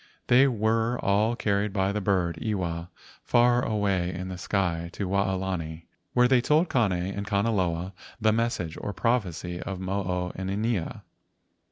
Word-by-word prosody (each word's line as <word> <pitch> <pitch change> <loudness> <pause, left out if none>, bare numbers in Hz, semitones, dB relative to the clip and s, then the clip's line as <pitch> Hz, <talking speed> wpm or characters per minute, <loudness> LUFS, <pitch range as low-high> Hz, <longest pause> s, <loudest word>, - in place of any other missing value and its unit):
They 130 +3 +7
were 115 0 +1
all 105 +4 +2
carried 100 -2 0
by 95 -1 +1
the 105 +1 -2
bird, 90 -4 0
Iwa, 90 -5 -2 0.3
far 120 0 +4
away 100 -5 0
in 90 +1 -5
the 90 - -5
sky 85 -3 -1
to 100 - -3
Waolani, 95 -4 -1 0.3
where 125 0 +5
they 125 -1 +4
told 155 +7 +2
Kane 115 -6 +3
and 95 +3 -3
Kanaloa 95 -4 0 0.3
the 110 -1 +3
message 110 -8 -1
or 105 - -4
prophecy 90 -8 -1
of 95 -2 -5
Mo 95 +2 -1
o 90 0 -2
inanea. 100 0 -2
100 Hz, 150 wpm, -27 LUFS, 90-110 Hz, 0.3 s, They